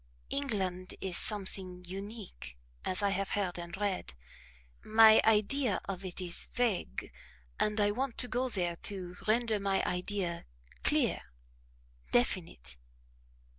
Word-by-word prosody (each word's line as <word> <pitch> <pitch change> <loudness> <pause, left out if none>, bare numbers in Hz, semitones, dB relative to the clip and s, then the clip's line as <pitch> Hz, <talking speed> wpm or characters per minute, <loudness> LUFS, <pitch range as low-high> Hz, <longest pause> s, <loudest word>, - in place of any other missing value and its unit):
"England 190 -10 -2
is 190 -2 -3
something 185 -3 -1
unique, 195 - -8 0.3
as 185 +2 -1
I 200 - +3
have 195 0 -1
heard 180 -3 -1
and 170 +1 -7
read; 190 - -2 0.7
my 220 0 +7
idea 220 +2 +3
of 195 -1 -5
it 185 -1 0
is 175 -2 -1
vague, 215 - -1 0.5
and 210 +1 +1
I 205 0 +3
want 255 +3 -2
to 250 - +2
go 250 +1 -1
there 175 -6 +2
to 180 -3 -5
render 225 -1 +2
my 195 -1 +1
idea 180 -1 -2 0.4
clear, - - +3 0.9
definite." - - 0
195 Hz, 125 wpm, -32 LUFS, 180-215 Hz, 0.9 s, my